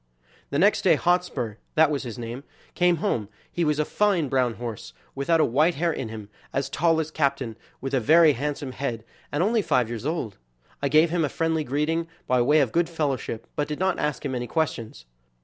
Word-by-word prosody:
The 140 Hz, -, -1 dB
next 200 Hz, +7 st, +4 dB
day 175 Hz, -4 st, +5 dB
Hotspur, 175 Hz, -, 0 dB, 0.2 s
that 155 Hz, -1 st, +5 dB
was 145 Hz, -, -1 dB
his 120 Hz, -1 st, -7 dB
name, 120 Hz, +3 st, -6 dB, 0.3 s
came 175 Hz, 0 st, +3 dB
home; 105 Hz, -3 st, -1 dB, 0.2 s
he 175 Hz, -, -1 dB
was 150 Hz, -2 st, +1 dB
a 150 Hz, -, +1 dB
fine 190 Hz, -8 st, +1 dB
brown 125 Hz, -3 st, +1 dB
horse, 115 Hz, -, -7 dB, 0.2 s
without 150 Hz, +5 st, +1 dB
a -, -, +5 dB
white 155 Hz, +8 st, +2 dB
hair 165 Hz, +2 st, 0 dB
in 120 Hz, -, -4 dB
him, 110 Hz, -2 st, -8 dB, 0.2 s
as 135 Hz, -, -2 dB
tall 165 Hz, 0 st, +2 dB
as 160 Hz, 0 st, -2 dB
Captain, 140 Hz, -6 st, -1 dB, 0.3 s
with 135 Hz, +1 st, -4 dB
a 135 Hz, -, +3 dB
very 155 Hz, +6 st, +6 dB
handsome 140 Hz, +1 st, -3 dB
head, 120 Hz, -4 st, -4 dB, 0.3 s
and 145 Hz, +4 st, +1 dB
only 220 Hz, +3 st, +2 dB
five 125 Hz, -, +1 dB
years 120 Hz, +2 st, -4 dB
old. 155 Hz, -, -3 dB, 0.4 s
I 140 Hz, -, +1 dB
gave 155 Hz, +3 st, +4 dB
him 170 Hz, -1 st, +1 dB
a 145 Hz, -, 0 dB
friendly 160 Hz, 0 st, 0 dB
greeting 150 Hz, +5 st, -1 dB, 0.2 s
by 125 Hz, -1 st, +2 dB
way 145 Hz, +5 st, +4 dB
of 130 Hz, -, 0 dB
good 170 Hz, 0 st, +1 dB
fellowship, 140 Hz, -8 st, -2 dB
but 145 Hz, -, -1 dB
did 150 Hz, -, -4 dB
not 190 Hz, 0 st, 0 dB
ask 150 Hz, 0 st, -2 dB
him 135 Hz, -, -2 dB
any 120 Hz, -1 st, -3 dB
questions. 115 Hz, -, -2 dB
145 Hz, 210 wpm, -25 LUFS, 125-165 Hz, 0.4 s, very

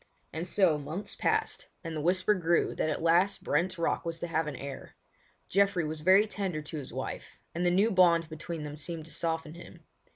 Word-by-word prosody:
And 165 Hz, +3 st, -3 dB
so 175 Hz, -5 st, +3 dB
months 160 Hz, +8 st, -5 dB
passed -, -, 0 dB
and 165 Hz, -2 st, -5 dB
the 155 Hz, -, -2 dB
whisper 185 Hz, +5 st, +3 dB
grew 170 Hz, -3 st, +1 dB
that 155 Hz, -, -1 dB
at 155 Hz, -, -2 dB
last 175 Hz, +4 st, +3 dB
Brent's 175 Hz, +5 st, +1 dB
Rock 170 Hz, -, 0 dB
was 165 Hz, -1 st, -3 dB
to -, -, -1 dB
have 160 Hz, -1 st, 0 dB
an 150 Hz, -, -4 dB
heir. 140 Hz, +1 st, -8 dB, 0.5 s
Geoffrey 195 Hz, -3 st, +2 dB
was 155 Hz, 0 st, -4 dB
very 190 Hz, +5 st, +6 dB
tender 190 Hz, -7 st, -3 dB
to 155 Hz, +1 st, -6 dB
his 135 Hz, -, -8 dB
wife, -, -, -6 dB
and 170 Hz, -, -2 dB
the 175 Hz, -, +4 dB
new 200 Hz, +6 st, +3 dB
bond 170 Hz, -3 st, +5 dB
between 160 Hz, 0 st, -6 dB
them 150 Hz, 0 st, -6 dB
seemed 160 Hz, +1 st, -5 dB
to 165 Hz, -, -10 dB
soften 160 Hz, -1 st, -2 dB
him. 175 Hz, -, -12 dB
165 Hz, 205 wpm, -30 LUFS, 155-185 Hz, 0.5 s, very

